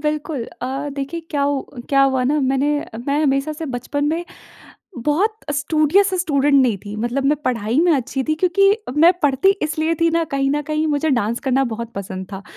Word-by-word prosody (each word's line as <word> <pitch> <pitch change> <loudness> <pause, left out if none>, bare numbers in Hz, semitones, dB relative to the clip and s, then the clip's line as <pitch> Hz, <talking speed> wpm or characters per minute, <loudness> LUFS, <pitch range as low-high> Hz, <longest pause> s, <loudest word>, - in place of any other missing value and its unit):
बिल्कुल 300 -3 -2 0.2
अ, 270 +3 -3
देखिए 280 +4 -4
क्या 285 -2 0
उ 280 -1 0 0.3
क्या 275 -1 +4
हुआ 265 -2 +2
ना 295 +4 +1
मैंने 270 +3 +1 0.3
मैं 290 +2 +1
हमेशा 275 +1 +1
से 315 +1 -6
बचपन 265 +3 -3
में 330 +3 -1 0.8
बहुत 385 +9 +1 0.2
स्टूडियस 310 +6 +2
स्टूडेंट 290 -4 +1
नहीं 255 -6 +4
थी 205 - -7
मतलब 240 +5 -2
मैं 295 +2 +3
पढ़ाई 230 +1 0
में 350 - +4
अच्छी 265 0 -1
थी। 310 - 0
क्योंकि 390 +4 +3 0.2
मैं 340 +3 +7
पढ़ती 280 +6 +3
इसलिए 315 +2 0
थी 335 0 +4
ना, 335 0 +1
कहीं 275 -2 -1
न 295 +1 0
कहीं 305 +1 -1
मुझे 300 +1 0
डांस 235 -2 0
करना 265 0 +1
बहुत 235 +1 -5
पसंद 190 -1 -6
था 195 0 -6
285 Hz, 190 wpm, -20 LUFS, 265-310 Hz, 0.8 s, मैं